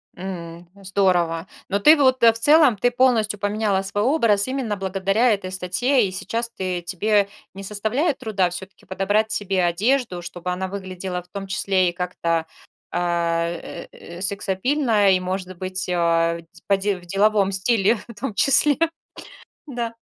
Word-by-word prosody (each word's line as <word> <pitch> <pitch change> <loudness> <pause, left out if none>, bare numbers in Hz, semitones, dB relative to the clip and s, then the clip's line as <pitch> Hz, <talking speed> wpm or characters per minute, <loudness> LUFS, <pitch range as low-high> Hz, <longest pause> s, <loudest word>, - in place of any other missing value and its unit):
М, 175 -2 -7 0.2
здорово. 180 -3 +1 0.2
Но 200 - 0
ты, 300 +10 +7
в 295 - -5
вот, 260 -2 +3
в 230 -1 +7
целом, 290 +2 +5
ты 245 +5 +1
полностью 235 -5 +2
поменяла 205 -1 0
свой 200 +2 -2
образ 230 -7 +2
именно 260 -5 -2
благодаря 195 +4 +1
этой 190 -2 -4
статье. 205 +8 +1
И 190 - -3
сейчас 230 +5 -3
ты 185 -5 -4
тебе 200 +3 +1 0.2
не 195 +1 -9
составляет 220 - -1
труда 200 -7 0
всё-таки 190 +2 -9
подобрать 205 +3 0
себе 195 -4 0
одежду, 190 +3 0
чтобы 175 +1 -6
она 185 +1 -3
выглядела 185 -1 -5
в - - -27
том 195 +1 -7
числе 190 -1 +1
и - - -6
как-то, 170 -2 -2 0.5
а, 170 -1 0
э, 170 0 -7
э, 170 +1 -11
сексапильно, 205 +3 +1
и, - - +1
может 185 0 -4
быть, 185 0 -4
а, 170 -1 +1
в 170 +1 -18
по 200 - +4
де 195 0 -1
в 175 - -15
деловом 200 +2 +2
стиле 205 +2 +2
в 235 - -10
том 250 -2 -3
числе. 280 +5 +4 0.9
Да. 240 -5 -4
195 Hz, 160 wpm, -22 LUFS, 180-220 Hz, 0.9 s, ты